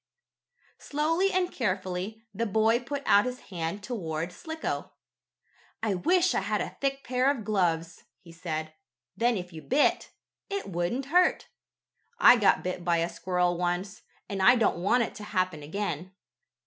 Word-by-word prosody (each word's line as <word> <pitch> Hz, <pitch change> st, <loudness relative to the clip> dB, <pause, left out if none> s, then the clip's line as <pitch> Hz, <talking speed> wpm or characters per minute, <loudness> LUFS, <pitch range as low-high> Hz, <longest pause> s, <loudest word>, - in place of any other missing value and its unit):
Slowly 330 Hz, +6 st, +1 dB
and 365 Hz, -1 st, 0 dB
carefully, 190 Hz, 0 st, -3 dB
the 230 Hz, +4 st, -1 dB
boy 220 Hz, +3 st, +3 dB
put 280 Hz, +3 st, -5 dB
out 205 Hz, +1 st, +5 dB
his 250 Hz, 0 st, -3 dB
hand 175 Hz, +3 st, -3 dB
toward 170 Hz, -8 st, -3 dB
Slicko. 320 Hz, -, -5 dB, 0.9 s
"I 215 Hz, -3 st, +1 dB
wish 350 Hz, -, +2 dB
I -, -, +2 dB
had 205 Hz, +2 st, -1 dB
a -, -, -4 dB
thick 275 Hz, 0 st, -1 dB
pair 255 Hz, +2 st, +1 dB
of 275 Hz, -6 st, -1 dB
gloves," 170 Hz, -5 st, -1 dB
he 170 Hz, -, -15 dB
said. 160 Hz, -2 st, -5 dB, 0.4 s
"Then 235 Hz, +2 st, +2 dB
if 180 Hz, -1 st, -7 dB
you 160 Hz, -, -8 dB
bit, 275 Hz, -, +2 dB, 0.4 s
it 400 Hz, 0 st, -3 dB
wouldn't 190 Hz, +9 st, -2 dB
hurt. 360 Hz, 0 st, +3 dB, 0.7 s
I 355 Hz, -, +8 dB
got 210 Hz, -5 st, +3 dB
bit 180 Hz, -1 st, -3 dB
by 175 Hz, -1 st, +2 dB
a 165 Hz, +1 st, 0 dB
squirrel 175 Hz, 0 st, 0 dB
once, 180 Hz, +4 st, -2 dB, 0.3 s
and 195 Hz, -2 st, -3 dB
I 245 Hz, +7 st, +7 dB
don't 220 Hz, -7 st, +1 dB
want 235 Hz, +6 st, +3 dB
it -, -, -5 dB
to 210 Hz, -, -8 dB
happen 185 Hz, -6 st, -1 dB
again." 180 Hz, +2 st, -4 dB
200 Hz, 160 wpm, -28 LUFS, 175-250 Hz, 0.9 s, I